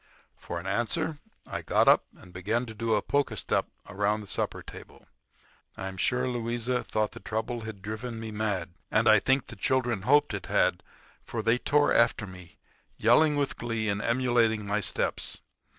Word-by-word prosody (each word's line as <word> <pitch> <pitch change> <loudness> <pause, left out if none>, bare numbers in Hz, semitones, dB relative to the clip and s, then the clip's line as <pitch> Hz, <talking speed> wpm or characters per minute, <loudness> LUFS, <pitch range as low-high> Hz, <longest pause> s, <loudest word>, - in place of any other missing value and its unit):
For 85 - -6
an 85 - -10
answer 120 - -1 0.3
I - - -4
got - - +2
up - - +6
and 90 - -15
began 105 +7 -1
to 110 - -8
do 110 0 0
a - - 0
polka 145 -1 0
step - - 0 0.2
around 105 +1 0
the - - -9
supper - - -2
table. - - -12 0.7
I 95 - -4
am 95 - -9
sure 125 +6 +1
Louisa 120 0 -1
thought 110 -1 -1
the - - -10
trouble 115 +2 -3
had 110 -3 -8
driven 110 +2 -5
me 110 -1 -6
mad; 105 -5 -2 0.2
and 110 +1 +2
I 110 -1 +7
think 135 +4 +2
the - - -10
children 120 0 0
hoped 145 +8 +4
it - - -5
had, - - +2 0.4
for 115 -2 -4
they 115 +2 +3
tore 145 +2 +3
after 115 -2 +3
me, 90 -3 -12 0.4
yelling 150 +7 +5
with 145 -1 -1
glee 115 -2 -2
and 100 +1 -1
emulating 115 -3 +2
my 105 +1 0
steps. 90 - -2
110 Hz, 180 wpm, -28 LUFS, 105-125 Hz, 0.7 s, I